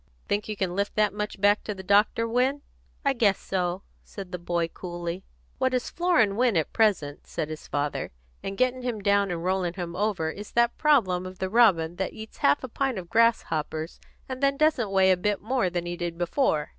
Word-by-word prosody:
"Think 205 +1 -1
you 215 - -2
can 185 -2 -1
lift 200 +1 -1
that 210 -2 +2
much 210 -1 -4
back 205 +1 +3
to 210 - -4
the 190 - -9
doctor, 205 +4 +3
Win?" 260 +5 +1 0.4
"I 275 - +3
guess 210 -6 +3
so," 180 0 -2 0.2
said 195 -3 -9
the 180 - -4
boy 170 -1 -1
coolly. 175 +1 -6 0.4
"What 260 -1 +1
is 250 - -2
flooring 325 - +2
Win 240 -6 +3
at 160 - -1
present," 195 -11 +1
said 155 - -3
his 155 0 -8
father, 145 0 -2 0.3
"and 195 0 -5
getting 255 0 +1
him 240 -4 -3
down 200 0 +3
and 170 -1 -3
rolling 180 -1 0
him 175 -2 -5
over, 185 -5 0
is 205 +4 -10
that 235 0 +3
problem 190 - +3
of 185 0 -10
the 190 0 -3
robin 175 -8 +4
that 190 - -2
eats 220 0 -10
half 140 - +3
a - - -3
pint 265 0 -1
of 175 -2 -7
grasshoppers 165 -8 +1 0.3
and 260 0 -6
then 275 0 +2
doesn't 300 -8 +2
weigh 190 -1 +4
a 185 - +3
bit 205 +2 0
more 235 -3 0
than 175 -1 -3
he 175 0 -3
did 175 -1 -4
before." 175 - 0
200 Hz, 210 wpm, -26 LUFS, 175-230 Hz, 0.4 s, robin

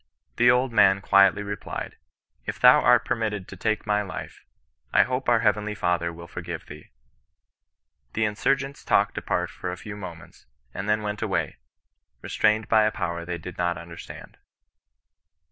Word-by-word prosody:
The 120 +1 +5
old 125 +1 +3
man 100 -2 +5
quietly 100 +1 +4
replied, 100 -1 -6 0.5
"If - - -4
thou - - +8
art - - +4
permitted 110 -5 -2
to - - -9
take 110 +3 -1
my 105 -1 +1
life, 100 -3 -8 0.5
I - - +6
hope 130 0 -2
our 120 -2 +4
Heavenly 105 -1 +1
Father 90 -3 0
will 85 0 -10
forgive 85 -2 -7
thee." 75 +1 -12 1.2
The 110 - +1
insurgents 135 +6 -1
talked - - +2
apart - - -2
for - - -5
a 90 - -6
few 100 +2 -8
moments, 85 -9 -11 0.3
and 100 - -4
then 105 0 +1
went 105 0 -4
away, - - -1 0.7
restrained 110 0 +1
by 110 -1 +4
a 110 - +2
Power 85 -4 -4
they 90 0 -4
did 90 +2 -9
not 85 -1 0
understand. 85 0 -11
105 Hz, 160 wpm, -25 LUFS, 90-110 Hz, 1.2 s, thou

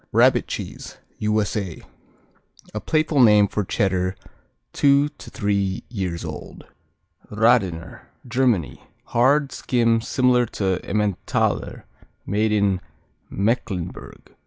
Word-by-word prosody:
Rabbit - - +4
Cheese - - -7 0.2
U.S.A. 105 -4 -1 0.9
A 105 - -3
playful 155 +2 +1
name 105 -3 +6
for 105 +1 -2
Cheddar 95 -1 0 0.6
two 140 +1 +4
to - - -13
three 100 -2 -1
years 95 -7 -4
old. - - -8 0.6
Radener 105 -7 +1 0.2
Germany 120 - 0 0.2
Hard; 135 +4 +2
skim, 115 -3 +1
similar 125 0 +2
to 95 -3 0
Emmentaler; 105 -2 -1 0.4
made 105 +2 0
in 100 -3 +1 0.5
Mecklenburg. 100 -4 -3
105 Hz, 95 wpm, -22 LUFS, 95-120 Hz, 0.9 s, name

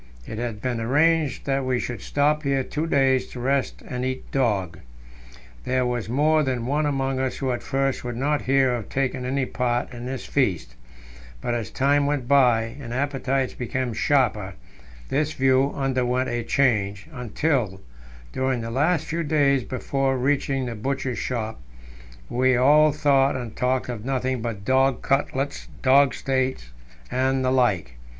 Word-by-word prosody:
It 110 - -6
had 115 -3 -4
been 120 -3 -1
arranged 150 +3 +2
that 135 -1 0
we 130 -1 0
should 120 -1 -5
stop 150 +1 +1
here 140 -2 0
two 155 +5 -3
days 135 -3 +2
to 125 - -9
rest 135 +2 -1
and 125 0 -4
eat 130 0 -4
dog. 100 - 0 0.8
There 130 0 0
was 120 -3 -2
more 155 +5 +3
than 130 -4 -1
one 145 +3 +1
among 135 -2 -1
us 130 -1 -1
who 135 -2 -1
at 120 - -3
first 135 -1 -1
would 120 -1 -4
not 145 +3 0
hear 135 -1 +2
of 120 -3 -4
taking 130 -1 -1
any 130 +1 0
part 125 0 -1
in 120 0 -7
this 130 0 -5
feast; 95 - 0 0.7
but 120 - -2
as 115 -4 -3
time 140 +1 +2
went 145 -4 -1
by, 120 -4 +3
and 120 -3 -7
appetites 135 -1 -1
became 125 0 -3
sharper, 110 -7 +1 0.5
this 150 +2 0
view 135 0 +3
underwent 130 -1 0
a 120 - -1
change, 105 -6 +1
until, 125 -4 -1 0.5
during 130 -2 0
the 115 0 -5
last 155 +5 +1
few 165 +1 -2
days 145 -4 +2
before 135 +1 -1
reaching 135 0 0
the 120 - -4
Butcher's 130 +1 -3
Shop, 110 - -3 0.7
we 130 - +2
all 150 +4 +5
thought 140 -2 +3
and 120 -4 -5
talked 130 0 0
of 120 -4 -5
nothing 130 -1 -1
but 110 -4 -5
dog 130 0 +2
cutlets, 135 0 -1 0.2
dog 135 -1 +5
steaks, 130 - -2 0.4
and 130 0 +1
the 130 - +2
like. 95 - +1
130 Hz, 160 wpm, -24 LUFS, 120-140 Hz, 0.8 s, all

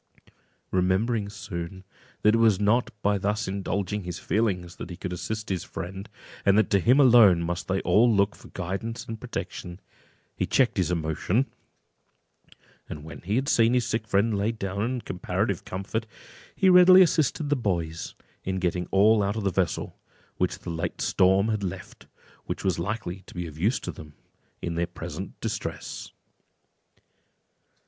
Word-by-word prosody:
Remembering 100 +4 +1
soon, 95 -3 -7 0.4
that 105 - +5
it 115 - +3
was 110 -4 +4
not 105 +4 +2
by 100 0 +2
thus 105 +2 -1
indulging 100 +1 -2
his 90 -1 -5
feelings 95 -6 -1
that - - -7
he 90 - -7
could 90 - -5
assist 110 +4 -4
his 95 -3 -1
friend, 95 +3 -7 0.3
and 100 +1 +4
that 110 - +2
to 100 - +4
him 125 - +4
alone 115 -10 +7
must 85 +1 -3
they 95 0 0
all 115 +3 +4
look 100 -1 +2
for - - -15
guidance 95 +6 -5
and 115 -1 -7
protection, 90 +1 -6 0.6
he - - -1
checked 130 -5 +2
his 90 -3 +1
emotion; 90 - 0 1.4
and 75 - -7
when 80 - -9
he 100 +5 -2
had 135 +3 0
seen 115 0 +4
his 125 -2 +2
sick 110 -2 -2
friend 110 +1 +2
laid 105 +3 -1
down 100 -1 -3
in 125 +3 -1
comparative 90 - -2
comfort, 100 +4 -4 0.5
he 190 - +2
readily 185 0 +9
assisted 155 -3 +1
the - - +4
boys 85 - -2 0.3
in 95 - -2
getting 90 -1 -1
all 105 +2 +5
out 100 +1 0
of 110 - -3
the 100 - +1
vessel - - -2 0.4
which - - 0
the - - -7
late 80 0 -3
storm 95 +3 +3
had 105 -2 -1
left, 90 - -7 0.4
which - - -4
was 95 -3 +1
likely 95 -1 -3
to - - -13
be 90 0 -3
of 80 -3 -9
use 105 +9 +2
to - - -5
them 75 -2 -12 0.5
in 85 - -2
their 85 +1 -1
present 90 - -7
distress. - - -5
100 Hz, 170 wpm, -26 LUFS, 90-115 Hz, 1.4 s, readily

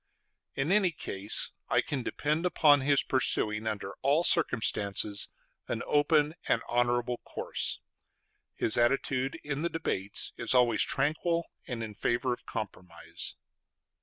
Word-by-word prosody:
In 135 +6 0
any 195 -2 +4
case 100 - 0 0.2
I - - +3
can 140 -3 -3
depend 150 +6 -1
upon 145 -5 +5
his 140 0 +3
pursuing, 110 -4 0
under 100 -2 -3
all 140 +5 +3
circumstances, 105 - +1 0.4
an - - -3
open 150 0 +3
and - - +1
honorable 120 0 +1
course.... - - -1 0.8
His 115 - +1
attitude 130 +2 +1
in 145 0 -3
the 170 - 0
debates 105 - 0
is 120 +2 +1
always 120 -3 +4
tranquil, 160 +4 0 0.2
and 120 -3 -4
in 110 -1 -6
favor 120 +4 0
of - - -9
compromise.... 90 -5 -6
130 Hz, 130 wpm, -30 LUFS, 110-150 Hz, 0.8 s, upon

